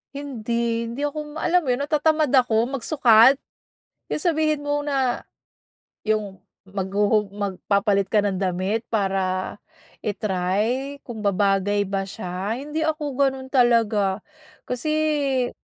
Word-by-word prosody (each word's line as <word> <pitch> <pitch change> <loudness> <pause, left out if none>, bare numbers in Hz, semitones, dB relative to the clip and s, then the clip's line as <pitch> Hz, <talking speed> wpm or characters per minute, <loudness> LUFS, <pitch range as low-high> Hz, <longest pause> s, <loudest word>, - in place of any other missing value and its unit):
Hindi, 235 -4 -2
hindi 285 +5 -2
ako 300 +1 -6
ma - - -1
alam 355 0 +3
'yon 250 -2 0
natatamad 310 0 +2
ako 235 -3 +3
magsukat, 260 -1 +5 0.7
yung 300 - -2
sabihin 310 -3 +1
mo 290 0 0
na 275 -4 0 0.8
yung 210 -3 -2 0.2
maghuhu 200 +2 0
magpapalit 200 0 0
ka 220 - +2
ng 195 -1 -1
damit 190 +4 0
para 190 -3 -1 0.4
i-try 210 +7 -1
kung 225 -3 -7
babagay 200 0 +1
ba 195 0 -2
siya, 190 +3 -4
hindi 300 +4 -4
ako 310 -2 -1
gano'n 265 -1 0
talaga, 225 -6 +2 0.4
kasi 285 -1 0
230 Hz, 115 wpm, -23 LUFS, 200-280 Hz, 0.8 s, magsukat